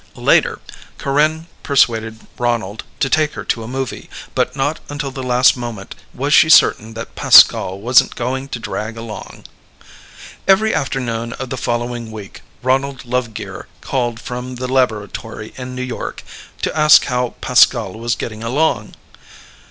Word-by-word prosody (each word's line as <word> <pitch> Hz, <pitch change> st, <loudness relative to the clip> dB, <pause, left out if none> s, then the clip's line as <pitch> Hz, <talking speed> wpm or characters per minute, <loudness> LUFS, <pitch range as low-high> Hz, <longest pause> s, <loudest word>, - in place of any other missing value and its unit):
Later, -, -, +2 dB, 0.4 s
Corinne 155 Hz, +3 st, +1 dB, 0.2 s
persuaded 115 Hz, -5 st, +1 dB
Ronald 115 Hz, -4 st, -1 dB, 0.2 s
to -, -, +3 dB
take 155 Hz, +1 st, +1 dB
her -, -, -6 dB
to 115 Hz, -, -1 dB
a 110 Hz, -, -7 dB
movie, 130 Hz, +1 st, -5 dB, 0.2 s
but -, -, 0 dB
not 145 Hz, +3 st, -1 dB
until 145 Hz, -1 st, -4 dB
the 130 Hz, -, -6 dB
last 125 Hz, 0 st, +4 dB
moment 120 Hz, -6 st, -7 dB, 0.2 s
was 140 Hz, +3 st, -1 dB
she 155 Hz, -, +6 dB
certain 110 Hz, -7 st, +5 dB
that 115 Hz, +1 st, -7 dB
Pascal 95 Hz, +1 st, +6 dB
wasn't 120 Hz, +4 st, +3 dB
going 130 Hz, +3 st, -3 dB
to 125 Hz, -, -5 dB
drag 115 Hz, 0 st, -5 dB
along. 115 Hz, -1 st, -9 dB, 1.0 s
Every 205 Hz, +3 st, +4 dB
afternoon 115 Hz, -4 st, -2 dB
of 130 Hz, -1 st, -7 dB
the -, -, -1 dB
following 120 Hz, -1 st, -3 dB
week 105 Hz, -3 st, -10 dB, 0.2 s
Ronald 135 Hz, +1 st, 0 dB
Lovegear 120 Hz, -3 st, -4 dB
called 120 Hz, -3 st, -2 dB
from 125 Hz, +2 st, -6 dB
the 125 Hz, +1 st, -4 dB
laboratory 110 Hz, -3 st, -2 dB
in 125 Hz, 0 st, -7 dB
New 130 Hz, -, -3 dB
York 130 Hz, -1 st, -6 dB, 0.4 s
to -, -, -1 dB
ask 150 Hz, -1 st, +6 dB
how 125 Hz, -1 st, -2 dB
Pascal 120 Hz, -5 st, +3 dB
was 115 Hz, +1 st, -2 dB
getting 110 Hz, -2 st, -6 dB
along. 115 Hz, -2 st, -1 dB
125 Hz, 145 wpm, -18 LUFS, 115-135 Hz, 1.0 s, she